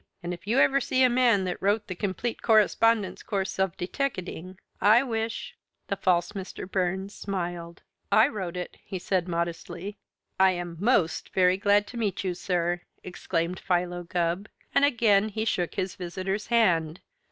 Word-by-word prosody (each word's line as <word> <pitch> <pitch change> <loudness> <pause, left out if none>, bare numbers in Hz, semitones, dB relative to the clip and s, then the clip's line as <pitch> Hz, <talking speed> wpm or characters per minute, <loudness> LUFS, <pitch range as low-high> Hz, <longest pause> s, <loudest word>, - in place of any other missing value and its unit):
And 175 +1 -3
if 175 +3 -11
you 235 +5 +1
ever 275 0 +4
see 260 +1 +2
the 255 - +6
man 240 -5 +4
that 180 -1 -3
wrote 205 +2 +1
the 185 - -5
'Complete 200 +5 -3
Correspondence 220 -1 +3
Course 195 -1 -3
of 190 -2 0
Deteckating,' 185 -4 -4 0.2
I 215 +6 +6
wish 230 - -3 0.2
" - - -51
The 200 - 0
false 175 -3 +1
Mr. 190 -2 -7
Burns 190 +1 -1
smiled. 175 -3 -5 0.3
"I 220 +3 +6
wrote 185 -9 -5
it," 180 - -6
he 190 - -5
said 180 0 -1
modestly. 170 +3 -4 0.4
"I 190 0 +6
am 175 -1 -5
most 200 -6 +1
very 185 -1 +4
glad 205 0 +3
to 240 - -9
meet 205 -5 -1
you, 185 -2 -1
sir!" 175 -1 -1 0.2
exclaimed 175 -1 -2
Philo 175 -1 -1
Gubb, 175 +3 -2 0.2
and - - +4
again 220 -6 +4
he 220 +1 -3
shook 180 -5 -1
his 190 -1 -2
visitor's 190 +3 -4
hand. 175 -9 +2
190 Hz, 165 wpm, -27 LUFS, 175-215 Hz, 0.4 s, the